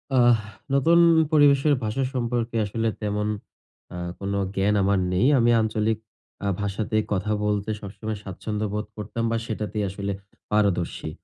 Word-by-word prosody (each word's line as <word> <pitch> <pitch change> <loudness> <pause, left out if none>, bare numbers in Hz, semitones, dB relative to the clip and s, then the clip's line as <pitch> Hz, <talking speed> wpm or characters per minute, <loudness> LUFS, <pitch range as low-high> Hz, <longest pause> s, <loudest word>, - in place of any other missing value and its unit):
আহ 120 -2 +6 0.4
নতুন 165 +5 +5 0.3
পরিবেশের 145 -1 +5
ভাষা 115 +5 -1
সম্পর্কে 120 -1 -1
আসলে 115 +2 -2
তেমন 105 0 -1 0.7
আ - - -6 0.2
কোনো 100 0 -2 0.2
জ্ঞান 100 +2 +2
আমার 100 -1 +2
নেই। 95 +8 +3
আমি 120 0 +4
আঞ্চলিক 110 0 0 0.5
আ - - +1
ভাষাতেই 110 +2 -1
কথা 100 +3 -1
বলতে 105 0 0
সবসময় 105 +1 -5
স্বাচ্ছন্দ্য 105 +2 -4
বোধ 105 +1 -2
করতাম 110 +2 -4
বা 115 - +1
সেটাতেই 105 -1 -3
আসলে 100 +1 -4 0.4
পারদর্শী। 100 -5 0
105 Hz, 140 wpm, -25 LUFS, 100-115 Hz, 0.7 s, আহ